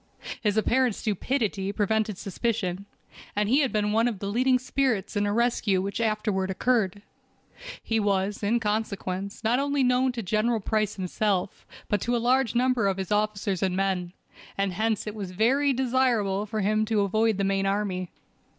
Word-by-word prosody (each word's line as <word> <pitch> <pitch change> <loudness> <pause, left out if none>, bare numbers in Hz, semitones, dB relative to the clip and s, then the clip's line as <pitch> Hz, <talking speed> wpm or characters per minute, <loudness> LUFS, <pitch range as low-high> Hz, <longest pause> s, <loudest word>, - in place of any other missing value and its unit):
His 210 -1 +1
apparent 240 +1 +2
stupidity 210 -2 -1
prevented 215 0 0
suspicion, 200 -2 -2 0.5
and 205 0 +1
he 260 +6 +4
had 270 -4 +1
been 210 -1 0
one 225 +2 +3
of 230 -4 -2
the 200 - -6
leading 255 +3 +3
spirits 250 -5 -1
in 205 0 +1
a - - 0
rescue 230 -4 +1
which 200 +4 -3
afterward 215 -3 0
occurred. 205 -1 0 0.8
He 225 -1 0
was, 200 -1 0
in 220 +3 +1
consequence, 200 -2 -3
not 235 +3 +2
only 280 0 +1
known 250 +1 +3
to 235 -2 -4
General 220 +4 +1
Price 215 0 -1
himself, 190 0 -2 0.2
but 205 -2 0
to 240 +1 0
a - - +2
large 245 +1 +2
number 250 -3 +2
of 195 -1 0
his 190 0 -4
officers 210 -3 0
and 185 -1 0
men, 185 -2 -1 0.4
and 195 -1 0
hence 220 +2 0
it 210 - -4
was 200 -4 -5
very 255 +10 +2
desirable 240 -6 +1
for 215 0 -2
him 215 +2 +2
to 215 -1 +1
avoid 215 +2 +1
the 200 - 0
main 195 0 +1
army. 195 -3 -1
210 Hz, 175 wpm, -26 LUFS, 195-235 Hz, 0.8 s, he